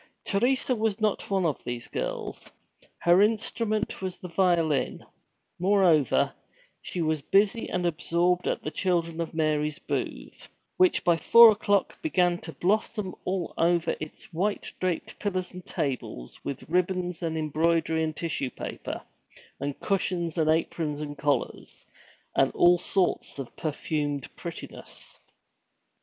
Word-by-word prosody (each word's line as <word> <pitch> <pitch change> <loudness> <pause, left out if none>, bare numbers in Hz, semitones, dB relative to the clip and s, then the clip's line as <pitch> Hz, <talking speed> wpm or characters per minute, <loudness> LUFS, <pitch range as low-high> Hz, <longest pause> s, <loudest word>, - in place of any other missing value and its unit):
Teresa 255 +5 +2
was 220 -2 0
not 215 -2 0
one 195 -2 +1
of 155 -4 -1
these 120 -1 -5
girls. - - -4 0.5
Her 175 +2 +5
instrument 215 0 0
was 185 -1 -4
the 180 - -8
violin; 170 -6 +1 0.5
moreover, 180 - +3 0.5
she 175 - -3
was 155 -1 0
busy 200 - +2
and 180 -1 -1
absorbed 175 +2 +1
at - - -1
the 155 - -3
Children 170 -3 0
of 165 0 -5
Mary's 150 -1 +1
booth, - - -5 0.3
which 370 -2 +4
by 170 -1 +4
four 230 +7 +9
o'clock 205 -2 0
began 180 - +2
to 160 - -8
blossom 205 +2 0
all 185 -2 -2
over 170 0 +2
its 155 +1 -9
white 200 +5 -1
draped 180 -3 -2
pillars 185 -3 -2
and 180 0 -9
tables 130 - -4
with 140 - -5
ribbons 180 0 0
and 160 -2 -2
embroidery 160 +1 +1
and 155 -1 -2
tissue 155 -5 -2
paper, - - -6 0.6
and 140 0 -4
cushions 180 -4 -1
and 155 -2 +2
aprons 155 -2 0
and 145 -1 -6
collars, 145 0 -2 0.5
and - - +4
all 175 0 +5
sorts 180 -3 0
of 135 -4 -7
perfumed 145 -2 -3
prettiness. - - -8
175 Hz, 135 wpm, -27 LUFS, 155-190 Hz, 0.6 s, four